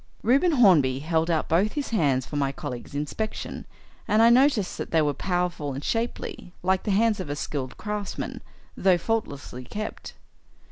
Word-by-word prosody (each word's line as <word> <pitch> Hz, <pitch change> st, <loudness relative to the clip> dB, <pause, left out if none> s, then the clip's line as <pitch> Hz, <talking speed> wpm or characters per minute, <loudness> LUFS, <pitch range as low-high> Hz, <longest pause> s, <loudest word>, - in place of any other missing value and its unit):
Reuben 280 Hz, +9 st, +4 dB
Hornby 170 Hz, -, +5 dB
held 160 Hz, +3 st, 0 dB
out 160 Hz, -2 st, +1 dB
both 190 Hz, +7 st, +2 dB
his 290 Hz, -2 st, -3 dB
hands 140 Hz, -, +2 dB
for -, -, -8 dB
my 140 Hz, -2 st, +1 dB
colleague's 125 Hz, 0 st, -7 dB
inspection, 150 Hz, +9 st, -4 dB, 0.4 s
and 215 Hz, +2 st, +4 dB
I 230 Hz, -, +7 dB
noticed 245 Hz, -6 st, +3 dB
that -, -, -4 dB
they 160 Hz, -2 st, +3 dB
were 145 Hz, -1 st, +1 dB
powerful 175 Hz, -5 st, -2 dB
and 135 Hz, +2 st, -6 dB
shapely, 225 Hz, -5 st, -3 dB
like 190 Hz, +1 st, +2 dB
the -, -, -4 dB
hands 215 Hz, +1 st, +3 dB
of 185 Hz, -, -5 dB
a 145 Hz, -, -2 dB
skilled 135 Hz, -3 st, -4 dB
craftsman, 210 Hz, -1 st, -4 dB, 0.3 s
though 185 Hz, -2 st, +4 dB
faultlessly 145 Hz, -, -3 dB
kept. 215 Hz, +11 st, -6 dB
180 Hz, 170 wpm, -26 LUFS, 145-215 Hz, 0.4 s, I